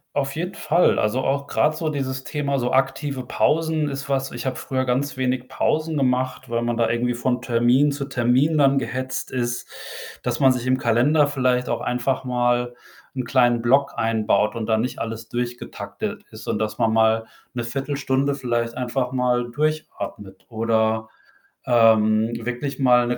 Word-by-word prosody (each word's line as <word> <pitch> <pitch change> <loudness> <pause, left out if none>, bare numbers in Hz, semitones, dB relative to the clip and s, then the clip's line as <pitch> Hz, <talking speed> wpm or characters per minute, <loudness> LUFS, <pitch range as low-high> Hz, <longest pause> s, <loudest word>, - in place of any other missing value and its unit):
Auf 140 0 -1
jeden 175 +4 -3
Fall. 175 +3 +2
Also, 115 +5 +1
auch 140 +1 -1
grad 155 +2 +2
so 155 0 -2
dieses 135 -2 -3
Thema 140 -2 -1
so 125 0 -1
aktive 135 0 0
Pausen 160 -1 +1
ist 135 0 -5
was 135 -1 0
ich 120 +1 -6
habe 130 - -1
früher 130 -1 -2
ganz 130 +3 -1
wenig 130 -1 -1
Pausen 155 0 0
gemacht, 130 -1 -1
weil 115 - 0
man 120 0 -1
da 115 -1 +2
irgendwie 120 +2 0
von 125 0 -1
Termin 125 +4 +3
zu 140 0 -4
Termin 130 +4 +2
dann 140 -1 +4
gehetzt 130 -1 -3
ist, 120 -1 -2 0.5
dass 120 -1 -2
man 135 -2 +6
sich 125 0 -2
im 130 - +3
Kalender 130 +6 +3
vielleicht 130 -3 0
auch - - -1
einfach 130 +2 -1
mal 120 0 0 0.4
'n 130 - -2
kleinen 120 -2 +3
Block 135 +4 +3
einbaut 110 -1 +1
und 115 -1 -3
da 110 - +2
nicht 120 +4 -2
alles 115 0 -5
durchgetaktet 120 0 -5
ist - - -11
und, 105 - -1
dass 110 0 -2
man 110 -1 +2
mal 110 0 +3 0.3
'ne 120 - -2
Viertelstunde 135 +2 -1
vielleicht 120 -3 -2
einfach 125 0 -1
mal 125 -1 +1
durchatmet 120 -8 -4
oder, 110 -1 0 0.6
ähm, 110 -2 +4
wirklich 125 +5 -4
mal 125 -2 +4
'ne 120 - -1
125 Hz, 170 wpm, -23 LUFS, 120-135 Hz, 0.6 s, man